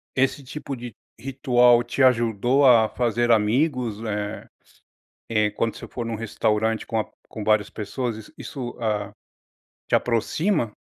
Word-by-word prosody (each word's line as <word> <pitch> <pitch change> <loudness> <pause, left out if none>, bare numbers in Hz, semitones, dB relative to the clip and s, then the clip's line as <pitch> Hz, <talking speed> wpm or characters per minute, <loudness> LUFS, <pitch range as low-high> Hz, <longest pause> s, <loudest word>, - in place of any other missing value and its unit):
esse 135 +1 +1
tipo 140 +1 -6
de 120 -3 -8 0.3
ritual 125 -3 +3
te 120 +3 0
ajudou 120 +2 +3
a 115 -4 +6
fazer 120 0 0
amigos, 115 0 +1
eh 105 -1 -4 0.8
eh, 105 -2 +2
quando 115 +2 -2
você - - -8
for 120 -2 -5
num 115 - -3
restaurante 110 0 -1
com 115 - -1
a - - -2 0.2
com 110 - -7
várias 105 -1 +2
pessoas, 115 +2 -4
is 110 - -12
isso, 125 -5 -6
hã, 105 -2 -2 0.8
te - - +1
aproxima? 120 - 0
115 Hz, 145 wpm, -24 LUFS, 110-125 Hz, 0.8 s, a